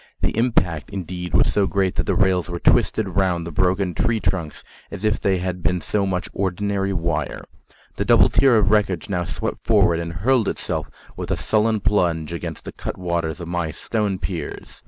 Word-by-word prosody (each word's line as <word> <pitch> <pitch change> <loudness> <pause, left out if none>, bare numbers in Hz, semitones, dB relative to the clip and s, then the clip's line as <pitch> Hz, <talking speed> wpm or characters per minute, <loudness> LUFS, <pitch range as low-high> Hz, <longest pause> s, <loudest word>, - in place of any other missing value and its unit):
The - - 0
impact, 90 -10 +1
indeed, 90 -3 -5
was - - +4
so 100 -2 +2
great 95 -2 +1
that - - -1
the - - +1
rails 95 -2 +2
were 85 - -3
twisted 85 - +2
round 90 -2 0
the 85 - -6
broken 95 +1 +1
tree 115 +4 +1
trunks 85 -7 -2 0.3
as 105 - -6
if 105 -1 +2
they 95 -1 +1
had 90 0 -3
been 90 +1 +1
so 100 +2 -1
much 95 +1 -2
ordinary 100 +1 -1
wire. 85 -5 -2 0.5
The - - -1
double - - +6
tier 135 -4 +4
of 105 -1 +3
wreckage 100 -5 +1
now 90 -3 -1
swept 80 - -4
forward, 85 -1 +3
and 85 0 -4
hurled 115 +6 +2
itself - - -3 0.3
with - - -6
a - - 0
sullen 110 0 +1
plunge 85 -6 +1
against 85 -2 -6
the - - -5
cutwaters 85 -3 -3
of 85 - -6
my 85 -2 -1
stone 105 +4 -2
piers. 90 -2 -6
90 Hz, 190 wpm, -22 LUFS, 85-100 Hz, 0.5 s, double